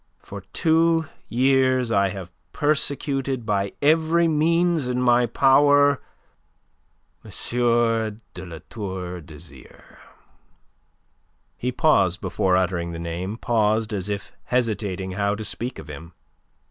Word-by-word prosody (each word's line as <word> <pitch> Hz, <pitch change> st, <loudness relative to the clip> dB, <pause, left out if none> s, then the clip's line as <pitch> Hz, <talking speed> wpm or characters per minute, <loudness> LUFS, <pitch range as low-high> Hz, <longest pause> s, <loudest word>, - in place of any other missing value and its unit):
For -, -, -8 dB
two 165 Hz, -1 st, +2 dB, 0.2 s
years 130 Hz, -1 st, +2 dB
I 100 Hz, -2 st, +3 dB
have 90 Hz, -2 st, -7 dB, 0.2 s
persecuted 140 Hz, -4 st, -1 dB
by 100 Hz, -2 st, -1 dB
every 160 Hz, +3 st, +3 dB
means 165 Hz, -1 st, +2 dB
in 125 Hz, 0 st, -1 dB
my 120 Hz, -1 st, +3 dB
power... 145 Hz, +3 st, +4 dB, 1.2 s
M. -, -, -12 dB, 1.0 s
de 90 Hz, -, -8 dB
La 85 Hz, -3 st, -9 dB
Tour 95 Hz, -4 st, -6 dB
d'Azyr." 75 Hz, -4 st, -12 dB, 1.6 s
He 125 Hz, -, -2 dB
paused 95 Hz, -, +2 dB
before 95 Hz, 0 st, +1 dB
uttering 85 Hz, -2 st, -1 dB
the -, -, -5 dB
name, 85 Hz, +5 st, -4 dB
paused 110 Hz, -2 st, +1 dB
as 100 Hz, -1 st, -3 dB
if 100 Hz, -1 st, -4 dB
hesitating 105 Hz, -6 st, -1 dB
how 100 Hz, +2 st, 0 dB
to 110 Hz, -, -6 dB
speak 120 Hz, +4 st, -4 dB
of -, -, -10 dB
him. 80 Hz, +3 st, -10 dB
115 Hz, 115 wpm, -23 LUFS, 95-140 Hz, 1.6 s, power